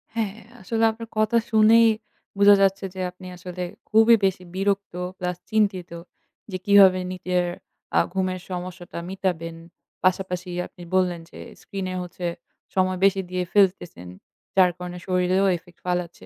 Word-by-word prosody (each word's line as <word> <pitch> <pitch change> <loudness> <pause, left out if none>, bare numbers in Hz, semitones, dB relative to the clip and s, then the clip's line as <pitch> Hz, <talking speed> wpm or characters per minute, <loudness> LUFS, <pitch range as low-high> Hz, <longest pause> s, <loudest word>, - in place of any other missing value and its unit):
হ্যাঁ, 215 -3 -1 0.3
আসলে 225 +4 -1
আপনার 225 0 -9
কথা 215 +2 +3
শুনেই 225 +1 +6 0.5
বোঝা 200 0 +8
যাচ্ছে 195 0 +2
যে - - -7
আপনি 185 +1 -12
আসলে 180 0 -6 0.3
খুবই 225 +2 +6
বেশি 190 -1 0
বিরক্ত 200 0 -1 0.2
plus 180 -1 -3
চিন্তিত 200 -5 +1 0.6
যে 185 - -2
কিভাবে 195 -2 +7
নিজের 180 0 -1 0.5
আ - - +7
ঘুমের 185 -1 -1
সমস্যাটা 180 -1 -6
মিটাবেন। 175 -4 -3 0.5
পাশাপাশি 185 0 0 0.2
আপনি 175 - -14
বললেন 180 -2 +2
যে - - -12 0.2
স্ক্রিনে 190 -2 -5
হচ্ছে 180 0 -7 0.5
সময় 185 0 +2
বেশি 195 0 +3
দিয়ে 180 0 -1
ফেলতেছেন। 180 - +1 0.5
যার 185 -2 +5
কারণে 180 0 -7
শরীরেও 185 +1 +2
effect 175 0 -20
ফালাচ্ছে। 180 -1 -3
185 Hz, 135 wpm, -24 LUFS, 180-200 Hz, 0.6 s, বোঝা